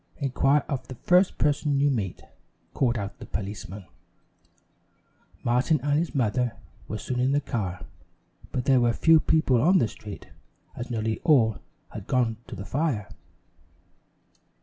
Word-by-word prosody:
"Inquire 140 +1 +2
of 130 -3 -4
the 130 - -8
first 180 +9 +3
person 145 -1 +1
you 145 0 +3
meet," 100 -8 -3 0.5
called 120 -2 +1
out 100 -2 -5
the - - -8
policeman. 100 0 -6 1.6
Martin 125 +6 +2
and 145 +1 +2
his 170 -1 -3
mother 125 -1 +1 0.3
were 110 - -4
soon 125 +3 -3
in 130 +2 +2
the 145 - +3
car, 95 - -4 0.7
but 125 - -2
there 130 -2 +4
were 120 -1 +3
few 160 +4 +5
people 140 -7 +2
on 180 +7 +5
the 120 - +3
street, 105 -1 -10 0.5
as 120 - -6
nearly 110 -2 -2
all 115 - +3 0.3
had - - -8
gone 120 -3 +1
to - - -7
the 100 - -7
fire. 135 -8 -1
125 Hz, 150 wpm, -26 LUFS, 110-145 Hz, 1.6 s, few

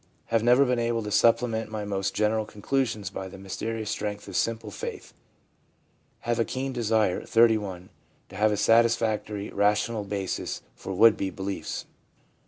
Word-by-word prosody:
Have 115 - +4
never 125 +4 +5
been 125 -1 +1
able 115 -1 0
to 105 - -5
supplement 115 0 +2
my 110 -1 -4
most 100 -1 -2
general 110 +1 +2
con 105 -2 -13
clusions 125 -7 -1
by 95 - -5
the 95 - -10
mysterious 110 +3 -4
strength 105 -1 -4
of 100 - -7
simple 115 +2 -1
faith - - -7 1.1
Have 120 0 -1
a - - +4
keen 130 +3 -3
desire 110 -5 +1
(31) 105 -5 +2 0.4
to - - -12
have 105 +2 +3
a 105 - 0
satisfactory 110 -3 +2
rational 105 +2 +1
basis 100 -2 -3
for 95 - -8
would 110 +4 +6
be 95 - -1
beliefs/ 95 +1 -4
M. - - -34
110 Hz, 165 wpm, -27 LUFS, 100-115 Hz, 1.1 s, would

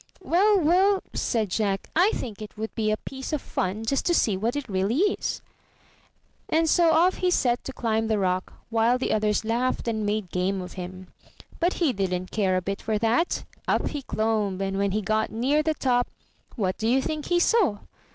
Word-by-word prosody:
'Well, 385 +3 +3
well," 375 +5 +3
said 220 -4 0
Jack, 200 -2 -1
"I 360 +5 +5
think 220 -3 -6
it 210 0 -9
would 220 +1 -4
be 220 -2 0
a 215 - +1
piece 265 +3 -7
of 305 - +1
fun 205 -2 -3
just 275 +4 0
to 345 - +3
see 210 -10 +2
what 225 +7 -1
it 290 -3 -3
really 195 +4 0
is." 395 +3 0 1.1
And 325 +1 +2
so 335 +1 +4
off 335 +4 +4
he 365 - +1
set 245 -8 +1
to - - -4
climb 225 -3 -1
the 220 -1 +1
rock, 185 -1 -1 0.2
while 230 +2 +3
the 255 - -1
others 215 0 +1
laughed 240 +3 -1
and 220 -2 -1
made 205 -3 -2
game 185 +2 0
of 180 -1 -7
him. 185 0 -8 0.5
But 350 +2 +2
he 320 -7 +1
didn't 185 -2 -2
care 190 -4 +1
a 185 - -2
bit 195 +2 -3
for 220 -1 -1
that; 230 +10 +1 0.2
up - - +1
he 290 - -4
clomb, 215 -6 -1
and 195 0 -2
when 200 0 +2
he 210 +2 -1
got 215 +1 0
near 265 +7 +1
the 310 0 0
top, 245 -3 +1 0.5
what 190 -5 -1
do 220 - 0
you 255 +3 +4
think 305 +2 -3
he 350 -1 +2
saw? 360 - +3
225 Hz, 205 wpm, -25 LUFS, 200-295 Hz, 1.1 s, I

